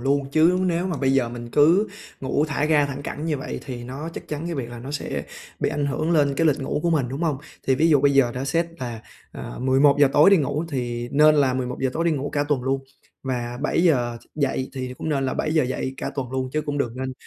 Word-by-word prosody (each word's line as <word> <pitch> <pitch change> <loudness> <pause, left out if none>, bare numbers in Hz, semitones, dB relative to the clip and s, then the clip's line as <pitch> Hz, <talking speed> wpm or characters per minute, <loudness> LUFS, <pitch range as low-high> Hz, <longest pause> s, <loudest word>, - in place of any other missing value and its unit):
luôn, 135 +1 0
chứ 165 +4 +4
nếu 175 +1 0
mà 180 - -2
bây 135 -1 +1
giờ 130 -3 +2
mình 120 0 -8
cứ 170 - +4 0.3
ngủ 135 +2 +1
thả 145 0 0
ga 150 -2 +3
thẳng 140 0 -6
cẳng 150 +2 -5
như 155 -3 0
vậy, 135 - -5
thì 120 -2 -6
nó 135 +6 -6
chắc - - -8
chắn 150 +2 -4
cái 170 - -3
việc 125 -4 -4
là 120 - -8
nó 130 +4 -8
sẽ 145 - -3 0.4
bị - - +1
ảnh 145 -1 -1
hưởng 155 +4 -1
lên 145 -4 +3
cái 165 - +2
lịch 150 -2 +2
ngủ 135 +2 -2
của 170 - +1
mình, 145 -6 +1
đúng 135 +6 -4
hông? 155 -5 +1 0.3
Thì 135 - +4
ví 160 +5 +3
dụ 150 -4 +5
bây 140 0 +4
giờ 130 -3 +4
đã 130 - -3
xét 165 +4 +1
là, 120 -3 -5 0.3
à, - - -7
11:00 140 +2 +4
tối 150 +7 +6
đi 200 - +7
ngủ 145 +1 -1
thì 120 -4 -3
nên 150 +1 +6
là 135 -3 +3
11:00 125 +1 -3
giờ - - -4
tối 165 - 0
đi 170 - +3
ngủ 145 -1 -2
cả 145 0 0
tuần 135 -4 +1
luôn, 135 +1 0 0.4
và 120 -2 -3
7:00 135 -8 +2
thức - - -25
dậy 135 -3 -1
thì 130 -1 -4
cũng - - -4
nên 140 -3 0
là 130 - -1
7:00 155 -1 +1
dậy 130 +1 -3
cả - - -4
tuần 130 -3 -4
luôn 130 -1 -1
chứ 155 - +1
cũng 145 0 -3
đừng 120 -3 -2
nên 130 0 -3
140 Hz, 265 wpm, -23 LUFS, 130-155 Hz, 0.4 s, đi